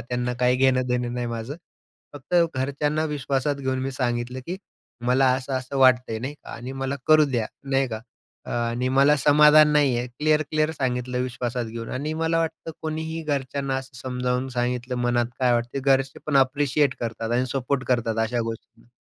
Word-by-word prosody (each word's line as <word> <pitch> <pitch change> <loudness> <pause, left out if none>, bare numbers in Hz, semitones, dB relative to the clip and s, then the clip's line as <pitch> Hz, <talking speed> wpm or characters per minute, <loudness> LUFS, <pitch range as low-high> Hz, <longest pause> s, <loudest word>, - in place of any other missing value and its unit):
त्यांना 125 +1 -2
काही 125 0 +3
घेणं 130 -1 +3
देणं 125 -1 -1
नाही 120 -1 -2
माझं. 115 +4 -4 0.6
फक्त 145 +5 -6 0.2
घरच्यांना 145 +4 0
विश्वासात 140 0 -1
घेऊन 130 -1 -2
मी 135 - -2
सांगितलं, 120 0 -2
की 180 +2 -3 0.5
मला 130 +2 +4
असं-असं 130 +1 -4
वाटतंय 125 -3 +4
नाही 135 +5 -5
का? - - -13
आणि 125 +3 -7
मला 135 +1 -3
करू 155 -1 +6
द्या 115 -4 0 0.2
नाही 135 0 +2
का? 110 -2 -5 0.4
अ, - - -9
आणि 120 +1 -1
मला 140 +3 +4
समाधान 150 +2 +6
नाही 140 -4 +3
आहे. 120 - -2
क्लिअर-क्लिअर 155 +3 +1
सांगितलं 125 -1 -1
विश्वासात 125 -1 -3
घेऊन 115 0 -6
आणि 150 +4 -3
मला 165 +1 0
वाटतं 165 0 -3
कोणीही 160 +1 -3
घरच्यांना 140 -2 -2
असं 130 -1 -7
समजावून 125 0 -2
सांगितलं 125 +1 -1
मनात 120 -1 +1
काय 125 -2 +3
वाटते? 120 +3 -1
घरचे 135 0 +1
पण 145 -2 +2
ॲप्रिशिएट 140 +1 +2
करतात 115 -1 -3
आणि 125 +2 +1
सपोर्ट 135 0 -1
करतात 115 -3 0
अशा 120 +1 -1
गोष्टींना. 115 0 -8
130 Hz, 170 wpm, -24 LUFS, 125-140 Hz, 0.6 s, करू